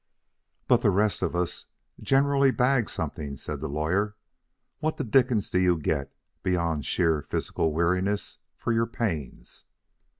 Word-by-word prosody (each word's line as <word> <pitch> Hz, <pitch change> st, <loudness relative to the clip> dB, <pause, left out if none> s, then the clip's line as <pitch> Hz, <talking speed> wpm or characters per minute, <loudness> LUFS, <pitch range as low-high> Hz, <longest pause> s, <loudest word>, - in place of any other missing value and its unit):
"But 120 Hz, -1 st, +4 dB
the 110 Hz, -, +4 dB
rest 100 Hz, +2 st, +1 dB
of -, -, -1 dB
us 90 Hz, 0 st, -2 dB, 0.3 s
generally 140 Hz, 0 st, +3 dB
bag 125 Hz, -2 st, +2 dB
something," 75 Hz, -4 st, -4 dB
said -, -, -6 dB
the -, -, -3 dB
Lawyer. 90 Hz, +9 st, 0 dB, 0.6 s
"What 155 Hz, +1 st, -1 dB
the -, -, -2 dB
dickens 120 Hz, -3 st, +2 dB
do 90 Hz, -, +2 dB
you 90 Hz, -2 st, +3 dB
get 70 Hz, -3 st, -2 dB, 0.3 s
beyond 85 Hz, -5 st, 0 dB
sheer 80 Hz, -4 st, +2 dB
physical 80 Hz, +2 st, -1 dB
weariness 90 Hz, +5 st, 0 dB, 0.2 s
for 115 Hz, -, -1 dB
your 115 Hz, 0 st, +2 dB
pains?" 80 Hz, -, -4 dB
90 Hz, 140 wpm, -27 LUFS, 80-115 Hz, 0.6 s, But